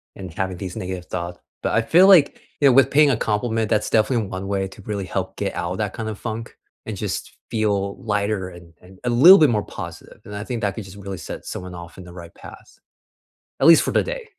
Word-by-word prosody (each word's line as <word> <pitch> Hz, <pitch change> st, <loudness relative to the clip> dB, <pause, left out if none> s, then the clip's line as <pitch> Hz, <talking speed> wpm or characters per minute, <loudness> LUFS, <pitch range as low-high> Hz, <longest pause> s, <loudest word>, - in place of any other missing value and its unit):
and 95 Hz, -3 st, -9 dB
having 95 Hz, 0 st, -3 dB
these 90 Hz, 0 st, -6 dB
negative 90 Hz, -1 st, -5 dB
thoughts. 85 Hz, -1 st, -5 dB, 0.2 s
But -, -, -1 dB
I 115 Hz, -, +2 dB
feel 180 Hz, +10 st, +5 dB
like, 175 Hz, -8 st, +5 dB, 0.2 s
you 140 Hz, -, +6 dB
know, 130 Hz, -, +6 dB
with 135 Hz, +1 st, +5 dB
paying 145 Hz, -1 st, +5 dB
a 125 Hz, -, +1 dB
compliment, 110 Hz, 0 st, -1 dB
that's 105 Hz, -, +1 dB
definitely 110 Hz, +1 st, +2 dB
one 95 Hz, +1 st, -6 dB
way 95 Hz, -1 st, -1 dB
to 95 Hz, -, -14 dB
really 100 Hz, -1 st, -4 dB
help -, -, -4 dB
get -, -, -2 dB
out -, -, -3 dB
of -, -, -6 dB
that -, -, -2 dB
kind 110 Hz, -1 st, -4 dB
of 110 Hz, -, -6 dB
funk 115 Hz, +1 st, -6 dB, 0.3 s
and 110 Hz, -, -5 dB
just 100 Hz, -1 st, -5 dB
feel 100 Hz, -3 st, -1 dB
lighter 105 Hz, -3 st, -1 dB
and 85 Hz, -2 st, -14 dB
and 90 Hz, +1 st, -17 dB
a 125 Hz, -, -1 dB
little 170 Hz, +11 st, +9 dB
bit 150 Hz, -5 st, +5 dB
more 105 Hz, -2 st, 0 dB
positive, -, -, -9 dB
and 105 Hz, -, -8 dB
I 105 Hz, -, -5 dB
think 120 Hz, 0 st, -4 dB
that 100 Hz, -2 st, 0 dB
could 110 Hz, -, -7 dB
just 95 Hz, +1 st, -12 dB
really 100 Hz, -1 st, -7 dB
set 80 Hz, -, -8 dB
someone 90 Hz, -1 st, -7 dB
off 85 Hz, -1 st, -11 dB
in 90 Hz, -, -10 dB
the 90 Hz, -, -12 dB
right 85 Hz, -1 st, -11 dB
pass, -, -, -14 dB, 0.8 s
at 135 Hz, -, +4 dB
least 165 Hz, -1 st, +8 dB
for -, -, -1 dB
the -, -, +3 dB
day. -, -, -6 dB
105 Hz, 245 wpm, -22 LUFS, 95-115 Hz, 0.8 s, little